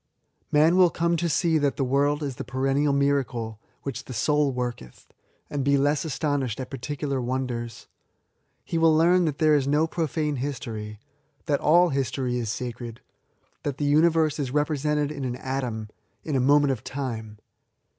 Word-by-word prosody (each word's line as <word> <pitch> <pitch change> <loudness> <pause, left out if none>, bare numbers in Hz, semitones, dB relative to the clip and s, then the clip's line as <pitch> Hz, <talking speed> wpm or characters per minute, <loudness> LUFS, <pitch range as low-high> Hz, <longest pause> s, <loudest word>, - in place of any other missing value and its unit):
" - - -49
Man 160 +4 +4
will 180 -2 +6
come 170 0 0
to 170 +1 0
see 160 +1 +2
that 145 -2 0
the 135 - +1
world 145 +3 +1
is 135 -3 -4
the - - -4
perennial 135 +3 +1
miracle 130 -6 0 0.2
which 130 -3 -5
the 125 - -7
sool 145 +4 +2
worketh, 120 - -6 0.3
and 145 -2 -3
be 140 +1 +3
less 145 +1 +1
astonished 145 -5 -1
at 130 - -6
particular 140 0 -3
wonders: 120 -2 -3 0.8
he 165 - -1
will 160 -1 +5
learn 175 +2 +4
that 150 -3 -1
there 155 -1 +4
is 140 -2 +2
no 150 +3 +3
profisne 155 -3 -1
history; 115 -6 -5 0.5
that 145 -2 +1
all 175 +3 +5
history 130 -3 -1
is 115 -3 -3
sacred; 120 -1 -6 0.6
that 140 -2 -3
the 145 -1 +1
nniyerse 160 -1 +3
is 135 -3 -1
represented 150 +1 0
in 140 -2 -5
an 125 -1 -2
atom, 125 -5 -3 0.4
in 150 - -2
a - - +3
moment 145 +2 +4
of 125 -3 -4
time. 115 -7 -5
140 Hz, 170 wpm, -25 LUFS, 125-150 Hz, 0.8 s, will